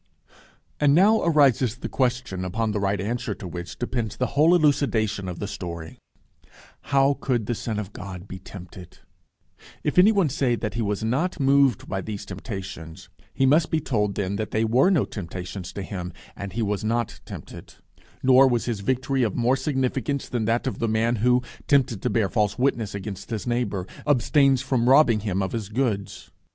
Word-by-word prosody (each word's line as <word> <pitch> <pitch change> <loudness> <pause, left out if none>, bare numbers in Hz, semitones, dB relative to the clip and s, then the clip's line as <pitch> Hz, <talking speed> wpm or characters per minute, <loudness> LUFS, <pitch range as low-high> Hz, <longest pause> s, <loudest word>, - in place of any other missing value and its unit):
And 145 -1 +4
now 210 +6 +5
arises 140 -7 +3
the 130 - -6
question 125 -7 -1
upon 110 +4 -1
the 105 - -1
right 100 0 0
answer 115 +6 -2
to 95 - -8
which 85 0 -7
depends 120 -3 -3
the 125 - +1
whole 160 +5 +5
elucidation 115 - +1
of 90 - -6
the 100 - -4
story: 85 -4 -7 0.9
How 140 0 +3
could 120 -5 0
the 120 - -1
Son 110 -1 -4
of 105 -1 -5
God 95 -1 -8
be 95 - -8
tempted? 90 -1 -11 0.9
If - - +2
any 200 +4 +7
one 195 -7 +2
say 130 -2 +1
that 110 -2 -4
he 115 - -2
was 105 0 -1
not 150 +11 -1
moved 135 -4 +3
by 95 - -2
those 105 0 -6
temptations, 95 -5 -8 0.2
he 135 - +1
must 155 +4 +4
be 160 - +1
told 105 -8 -1
that 100 -1 -2
then 110 0 -2
they 110 +1 +1
were 125 +10 +4
no 175 -9 +3
temptations 90 -1 -7
to 100 - -5
him, 90 -2 -6 0.2
and 100 -2 -7
he 115 +2 -1
was 105 -1 -1
not 115 +1 -1
tempted; - - -10 0.5
nor 130 +1 +7
was 120 -3 0
his 115 -4 -2
victory 130 +5 0
of 110 -5 0
more 125 +2 +2
significance 135 0 -1
than 120 -3 -2
that 115 +2 0
of 130 - -3
the 115 - 0
man 115 +2 +1
who, 125 +3 +3 0.2
tempted 130 -8 +2
to - - 0
bear 110 -4 +1
false 105 0 0
witness 120 -6 0
against 100 -1 -6
his 110 -3 -4
neighbour, 120 -6 -1 0.2
abstains 135 -1 +3
from 125 -3 +1
robbing 130 -5 +6
him 100 -2 -1
of 95 - -3
his 110 -4 -4
goods. 110 -4 -2
115 Hz, 190 wpm, -24 LUFS, 100-130 Hz, 0.9 s, any